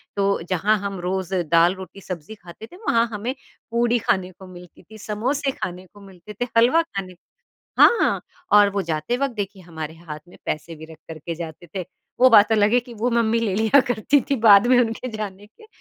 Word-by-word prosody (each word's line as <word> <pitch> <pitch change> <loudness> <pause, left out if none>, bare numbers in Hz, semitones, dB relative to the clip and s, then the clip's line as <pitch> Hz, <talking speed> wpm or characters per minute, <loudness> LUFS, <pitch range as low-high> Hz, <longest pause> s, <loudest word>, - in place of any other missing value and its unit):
तो 200 -2 0
जहाँ 205 +4 +2
हम 200 -1 -5
रोज़ 190 +1 -3 0.2
दाल-रोटी, 185 +3 +1
सब्ज़ी 180 +3 -8
खाते 175 +2 -12
थे। 345 - -16
वहाँ 230 0 +3
हमें 230 +5 -3 0.4
पूड़ी 235 +1 +2
खाने 185 -3 -1
को 185 +1 -15
मिलती 180 -1 -14
थी, 220 - -14
समोसे 255 +7 -2
खाने 185 -4 -6
को 205 - -16
मिलते 195 +1 -13
थे, 245 +5 -3
हलवा 250 +9 +5
खाने 195 - -7
को 175 - -28 0.6
हाँ 470 - +4 0.3
और 205 -1 +7
वो 200 0 -2
जाते 160 +9 -2
वक़्त 275 -2 -2
देखिए 200 -2 -5
हमारे 160 -2 -7
हाथ 160 -2 -9
में - - -16
पैसे 160 +2 -4
भी 160 - -11
रख 160 - -12
कर 160 - -8
के 165 +2 -6
जाते 165 0 -8
थे। 185 -2 -3 0.4
वो 255 - +8
बात 220 0 +6
अलग 210 0 +3
है 245 - +5
कि 240 0 -13
वो 235 +3 -1
मम्मी 230 -1 +1
ले 215 -5 -1
लिया 220 +7 +4
करती 245 +5 +2
थी 275 - +2
बाद 205 +2 +8
में 255 0 +4
उनके 230 +2 -2
जाने 205 -1 -7
के। 225 - -20
200 Hz, 210 wpm, -22 LUFS, 180-230 Hz, 0.6 s, वो